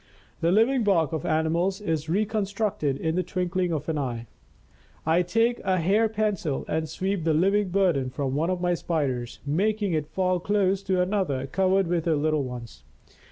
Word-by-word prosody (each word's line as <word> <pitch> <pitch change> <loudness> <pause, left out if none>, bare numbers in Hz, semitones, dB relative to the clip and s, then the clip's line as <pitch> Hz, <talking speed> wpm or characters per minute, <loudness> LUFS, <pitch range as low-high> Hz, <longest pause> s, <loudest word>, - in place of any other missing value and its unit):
The 170 - +2
living 230 +5 +3
bark 170 -6 +2
of 160 +2 -3
animals 165 +4 +1
is 160 -6 -2
reconstructed 200 -6 0
in 160 +2 -1
the 180 - +1
twinkling 180 -1 -1
of 150 -3 -3
an 160 -2 -1
eye. 120 -4 -3 0.8
I 165 +3 +3
take 225 +7 +1
a 185 -1 0
hair 200 +6 +2
pencil 210 -10 -1
and 160 0 -2
sweep 190 +2 -2
the 160 -1 +2
living 195 +4 +2
burden 175 -9 +1
from 130 +1 -3
one 155 +5 0
of 185 -1 -1
my 175 0 +2
Spiders, 140 -8 -2
making 200 +6 0
it 155 -2 -1
fall 185 +2 0
close 195 0 +1
to 190 -2 +1
another 180 -9 -1
covered 190 +6 +2
with 170 -1 -1
her 165 -2 +2
little 155 0 +1
ones. 125 -3 -8
175 Hz, 175 wpm, -26 LUFS, 155-195 Hz, 0.8 s, living